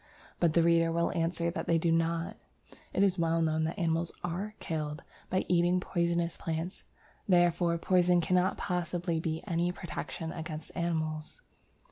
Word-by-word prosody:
But 170 -3 +3
the 170 - +4
reader 165 0 +4
will 170 0 +1
answer 170 0 0
that 180 - -4
they 165 - +4
do 165 0 +1
not; 165 0 0 0.6
it 195 - +2
is 190 -2 +3
well 165 0 +2
known 160 -1 +1
that 160 - -3
animals 165 -2 0
are 185 +5 -3
killed 155 -2 -3 0.3
by 185 - 0
eating 175 +1 +3
poisonous 170 -2 0
plants, 165 +3 -4 0.5
therefore 175 -1 +3
poison 180 0 +3
cannot 180 +2 +2
possibly 175 -2 -1
be 160 0 -3
any 175 -2 0
protection 170 -2 -5
against 155 -1 -6
animals. 155 -2 -2
170 Hz, 150 wpm, -31 LUFS, 165-175 Hz, 0.6 s, the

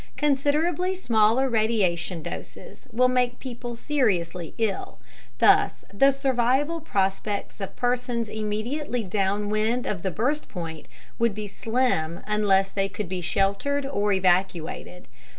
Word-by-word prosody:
Considerably 300 +6 +1
smaller 230 - +3
radiation 195 -8 +1
doses - - -9
will 250 +3 +4
make 250 -1 +1
people 240 -2 -6
seriously 180 - -1
ill. 220 -4 -2 0.4
Thus, - - +4
the 275 +7 +5
survival 270 +4 +1
prospects 200 -4 -2
of 195 - -5
persons 245 -2 -1
immediately 220 +5 -2
downwind 210 +4 0
of 190 -5 -2
the 190 - -1
burst 265 - -1
point 165 -3 -6 0.3
would 230 -3 +2
be 210 -1 -4
slim 205 -7 0
unless 195 -2 +2
they 195 -1 0
could 195 -1 -5
be 185 -1 -3
sheltered 200 +11 0
or 210 -7 0
evacuated. 180 -2 0
215 Hz, 120 wpm, -25 LUFS, 195-255 Hz, 0.4 s, the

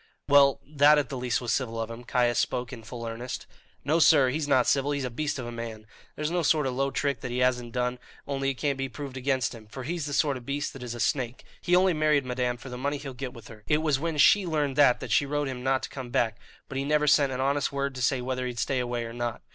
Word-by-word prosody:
"Well, 140 -1 +5
that 150 +1 +5
at 145 -5 0
least 125 -2 -1
was 120 -3 -1
civil 115 -4 -2
of 115 0 -3
him." 115 +1 -8
Caius 120 -1 +1
spoke 125 0 -1
in 115 - -8
full 115 +1 -7
earnest. 115 +2 -5 0.4
"No, 155 +4 +2
sir; 145 -5 +6
he's 150 +3 -2
not 130 -4 +4
civil; 140 0 +2
he's 140 -1 -2
a 125 - -4
beast 150 +5 -2
of 130 - -5
a 120 - -5
man. 115 -2 -7 0.3
There's 150 +1 -2
no 175 0 +1
sort 155 -1 +2
of 130 - -1
low 135 +2 0
trick 140 -3 -1
that 125 - -4
he 120 - -3
hasn't 125 -1 +1
done, 125 +1 -1 0.3
only 135 -1 -1
it 135 - -2
can't 140 0 -1
be 135 0 -2
proved 140 0 -7
against 130 -2 0
him; 110 -2 -12
for 130 +4 -8
he's 160 +1 -3
the 145 - -4
sort 140 -2 +2
of 125 - -11
beast 145 +1 -2
that 135 - -10
is 120 -1 -5
a - - -8
snake; 125 0 -1 0.2
he 180 - +2
only 185 0 +4
married 155 -3 +2
madame 125 -1 -1
for 130 - -10
the 125 0 -6
money 140 +2 -1
he'll 140 -1 -7
get 125 0 -6
with 115 - -12
her. 110 -2 -13
It 150 +1 +2
was 150 -4 +2
when 165 0 -2
she 200 +7 +6
learned 150 -4 0
that 140 -4 +5
that - - -6
she 145 - +3
wrote 145 +1 -1
to 135 - -3
him 125 -1 -6
not 130 0 +1
to - - -4
come 130 -3 -7
back; 115 -3 0 0.3
but 135 - -4
he - - -1
never 150 +1 +2
sent 145 -2 +4
an 130 - -3
honest 140 +3 +1
word 140 0 -2
to 130 - -6
say 130 +1 +1
whether 130 0 -2
he'd 120 -1 -6
stay 130 +2 0
away 120 -1 -2
or 115 - -7
not. 120 -1 -4
130 Hz, 280 wpm, -27 LUFS, 125-145 Hz, 0.4 s, sir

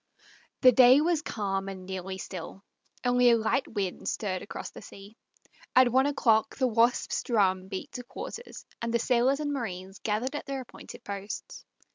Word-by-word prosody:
The 255 - +8
day 255 +2 +7
was 325 0 +1
calm 195 -7 -3
and 190 -1 -8
nearly 190 0 -5
still; 190 +1 -8 0.4
only 245 0 +5
a 235 - +5
light 225 +4 0
wind 200 -5 -3
stirred 185 -4 -2
across - - -7
the - - -11
sea. 200 +1 -13 0.6
At 255 -1 +6
one 265 +3 +4
o'clock 225 -6 +2
the 260 - +2
Wasp's 235 0 +2
drum 190 -5 +1
beat 190 +10 -6
to 250 - -6
quarters, 470 - -8 0.2
and 235 0 -2
the 235 - +3
sailors 250 +3 +2
and 290 -1 -2
marines 190 -7 -5
gathered 225 +6 -2
at - - -5
their 275 -1 -3
appointed 250 - -12
posts. 200 +2 -7
230 Hz, 170 wpm, -28 LUFS, 195-255 Hz, 0.6 s, The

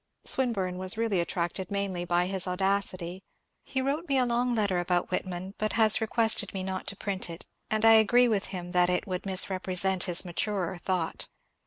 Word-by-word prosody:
Swin 260 -2 +3
burne 185 -4 -3
was 185 +2 +1
really 225 -5 0
attracted 175 +1 -3
mainly 195 -3 -2
by 175 0 +1
his 190 0 0
audacity; 185 -1 -1 0.4
he 265 -1 -3
wrote 295 +5 -2
me 275 - +2
a 255 - +3
long 240 0 0
letter 200 -5 +1
about 175 0 -1
Whitman, 185 +1 -4
but 215 0 -1
has 220 -1 +5
requested 220 -2 0
me 190 - -3
not 190 0 -4
to 200 - -1
print 195 -3 -3
it, 165 0 -7 0.2
and 215 0 +1
I 225 - +8
agree 230 +3 +5
with 210 -4 0
him 175 -2 -6
that 180 -1 +3
it 180 - 0
would 185 0 -4
misrepresent 185 0 +1
his 180 0 +2
maturer 185 0 -2
thought. 180 -3 -2
190 Hz, 190 wpm, -28 LUFS, 180-215 Hz, 0.4 s, I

